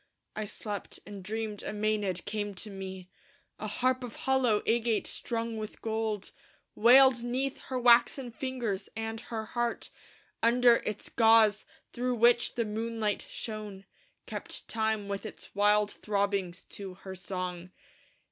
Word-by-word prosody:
I 215 - -2
slept; 205 -1 -6
and 200 -2 -8
dreamed 215 +1 -3
a - - -5
Mænad 210 -4 -1
came 205 -2 -3
to 210 +3 -6
me: 190 -1 -7 0.5
A 215 - -4
harp 255 +4 +1
of 240 -2 -7
hollow 255 -5 +2
agate 230 -1 +2
strung 230 -1 -3
with 215 -1 -7
gold 220 -2 -2 0.4
Wailed 250 +2 +7
'neath 260 +3 -1
her 260 - -3
waxen 240 +1 +4
fingers, 230 -6 -3
and 225 0 -4
her 220 -2 -5
heart 240 +1 -2 0.5
Under 235 +1 +6
its 210 -1 -3
gauze, 225 -2 +5 0.3
through 250 +1 0
which 240 +1 +4
the 235 - 0
moonlight 220 -1 -2
shone, 210 -3 -6 0.4
Kept - - -6
time 220 -2 0
with 200 0 -3
its 215 - -10
wild 210 +1 +3
throbbings 200 -3 -1
to 195 -2 -7
her 190 0 -9
song. 180 -1 -5
220 Hz, 140 wpm, -30 LUFS, 205-235 Hz, 0.5 s, Wailed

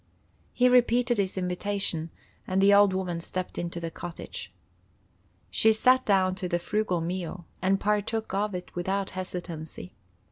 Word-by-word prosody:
He 250 - +3
repeated 245 -1 +4
his 190 -1 -1
invitation, 180 -2 -1 0.4
and 185 +1 +1
the 200 +1 +6
old 200 -1 +6
woman 185 -3 -2
stepped 185 +2 -4
into 170 0 -4
the 165 -1 -4
cottage. 175 +1 -8 1.0
She 220 - +5
sat 255 +4 +4
down 190 -2 +3
to 185 -3 -3
the 175 - +1
frugal 185 0 -1
meal, 175 0 -4 0.2
and 190 +1 +2
partook 210 +1 -1
of 200 0 0
it 180 - -7
without 190 +2 -2
hesitancy. 175 - -6
190 Hz, 145 wpm, -27 LUFS, 175-205 Hz, 1.0 s, the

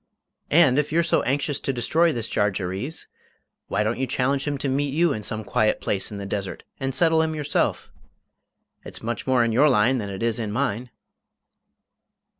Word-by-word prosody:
"And 150 -4 +5
if 150 - -1
you're 170 +2 +3
so 170 - +2
anxious 140 +1 -1
to - - -1
destroy 160 +7 +2
this 115 -5 -3
Jarjarees, 100 - -2 0.6
why 100 +2 0
don't 110 +3 -2
you 130 - -1
challenge 135 +3 0
him 145 -1 -2
to 140 - -3
meet 140 +1 -1
you 165 -2 +3
in 110 - -4
some 110 +1 -3
quiet 110 0 +1
place 95 -2 0
in 105 - -6
the 100 - -6
desert 100 -1 -4 0.2
and 135 0 -2
settle 160 +2 +4
him 160 0 -1
yourself? 150 -1 -1 0.9
It's - - -8
much 115 +1 -4
more 130 -2 +3
in 115 - 0
your 140 +7 +4
line 125 +1 +3
than 100 -2 -4
it 95 +2 -5
is 115 0 +1
in 110 -3 -3
mine!" 120 0 -2
125 Hz, 190 wpm, -24 LUFS, 110-145 Hz, 0.9 s, And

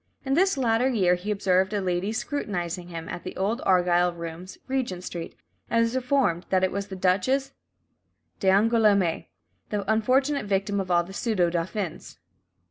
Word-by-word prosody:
In 270 - 0
this 375 +1 +3
latter 245 0 +2
year 190 -8 +3
he 180 +4 -4
"observed 190 -1 +1
a 205 - +1
lady 185 +1 -1
scrutinising 180 - -3
him," 165 -2 -7
at - - -6
the 185 - -7
Old 210 +6 -1
Argyle 180 -1 +3
Rooms, 170 +2 -8
Regent 245 -9 -2
Street, 170 -2 -6 0.3
and 230 0 +3
was 230 +2 -1
informed 250 -9 +1
that 185 -1 +2
it 185 - +2
was 200 +1 -3
the 195 - -7
Duchess 190 +10 +1 0.9
d'Angoulême, 200 -2 +3 0.4
the 205 0 -1
unfortunate 265 +4 +1
victim 200 +1 0
of 190 -1 -3
all 175 -1 +3
the 190 +3 -11
pseudo 195 -6 +1
dauphins. 175 +1 -4
195 Hz, 160 wpm, -26 LUFS, 180-230 Hz, 0.9 s, this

